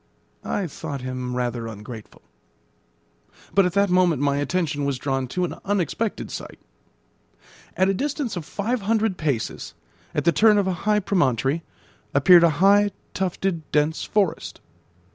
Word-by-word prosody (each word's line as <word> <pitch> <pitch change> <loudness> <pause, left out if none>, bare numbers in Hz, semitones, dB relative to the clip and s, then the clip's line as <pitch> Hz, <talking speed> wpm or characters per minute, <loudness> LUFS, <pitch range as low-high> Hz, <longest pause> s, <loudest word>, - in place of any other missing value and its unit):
I 200 - -2
thought 140 -3 -6
him 125 -1 -4
rather 120 -2 -2
ungrateful. 110 +1 -10 1.3
But 195 -2 +4
at 180 - -4
that 200 -1 +2
moment 180 -5 +3
my 140 0 +1
attention 145 0 -1
was 140 -2 -1
drawn 135 -1 -2
to 180 +8 -1
an - - -5
unexpected 205 +2 -2
sight. - - -7 1.2
At 190 +1 +3
a 195 - +2
distance 280 +1 -2
of 175 - -4
five 215 +8 -2
hundred 215 -1 0
paces, 140 -8 -3 0.4
at - - 0
the 170 - +5
turn 215 +3 +5
of 200 - +2
a 190 - 0 0.2
high 210 0 +3
promontory, 145 - +1 0.5
appeared 170 +5 +7
a 170 - +6 0.2
high, 205 +1 +5 0.2
tufted, 180 -3 -2
dense 150 +2 +1
forest. 200 -6 -1
175 Hz, 145 wpm, -23 LUFS, 140-200 Hz, 1.3 s, appeared